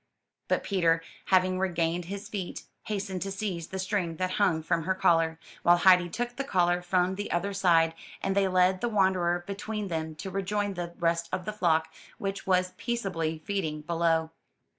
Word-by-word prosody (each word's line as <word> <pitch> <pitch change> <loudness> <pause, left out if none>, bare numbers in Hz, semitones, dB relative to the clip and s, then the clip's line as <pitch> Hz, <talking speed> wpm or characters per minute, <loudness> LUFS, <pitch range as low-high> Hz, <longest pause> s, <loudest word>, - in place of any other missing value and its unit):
But - - +1
Peter, 165 -4 +2 0.2
having 185 0 +3
regained 170 -2 0
his 200 +3 -6
feet, 195 -4 -5 0.2
hastened 195 -3 -3
to 195 - -2
seize 190 -4 -3
the 190 - -6
string 185 -3 -1
that 185 +2 -1
hung 170 -6 +2
from 165 -1 0
her 190 +1 +1
collar, 165 -3 +3 0.2
while 175 0 +5
Heidi 180 -1 +5
took 240 +6 -3
the 275 - -1
collar 180 -8 +2
from 180 +1 +1
the 205 +2 -5
other 195 +4 0
side; 165 -4 +3 0.3
and 195 - -1
they 200 -1 +3
led 185 0 +3
the 240 - 0
wanderer 185 -4 +2
between 200 +1 -4
them 160 -1 -3
to 190 +4 -6
rejoin 200 +1 -1
the 175 -1 -5
rest 170 0 0
of 185 -1 -3
the 215 - -3
flock, 160 -5 +1 0.2
which 195 -1 -4
was 185 -1 +2
peaceably 170 -9 -2
feeding 160 -7 -2
below. 165 0 +1
185 Hz, 180 wpm, -28 LUFS, 170-195 Hz, 0.3 s, while